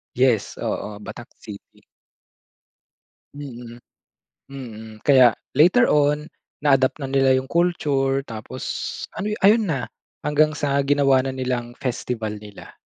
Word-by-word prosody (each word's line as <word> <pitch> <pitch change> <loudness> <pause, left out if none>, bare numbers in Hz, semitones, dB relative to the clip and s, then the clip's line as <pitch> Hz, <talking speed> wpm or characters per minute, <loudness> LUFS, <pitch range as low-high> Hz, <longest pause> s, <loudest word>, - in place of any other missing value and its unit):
Yes, 125 -4 +1
oo, 105 -1 -4
Batac 120 +3 -9
City. 105 -2 -12 1.5
Mm, 120 -4 -9 0.7
mm, 110 -5 -9
kaya 130 -4 +6 0.2
later 175 - +5
on, 150 -2 +2 0.4
na-adapt 135 -2 +3
na 145 - -5
nila 135 -1 +3
yung 130 - -2
culture. 140 -6 +1
Tapos 115 +2 -8 0.5
ano, 205 - -3 0.2
ayun 215 +2 +5
na, 135 -6 -1 0.4
hanggang 150 0 +2
sa 140 -1 +1
ginawa 140 -1 +3
na 135 - -3
nilang 125 -2 -3
festival 115 -4 -4
nila. 105 -2 -12
135 Hz, 115 wpm, -22 LUFS, 120-145 Hz, 1.5 s, kaya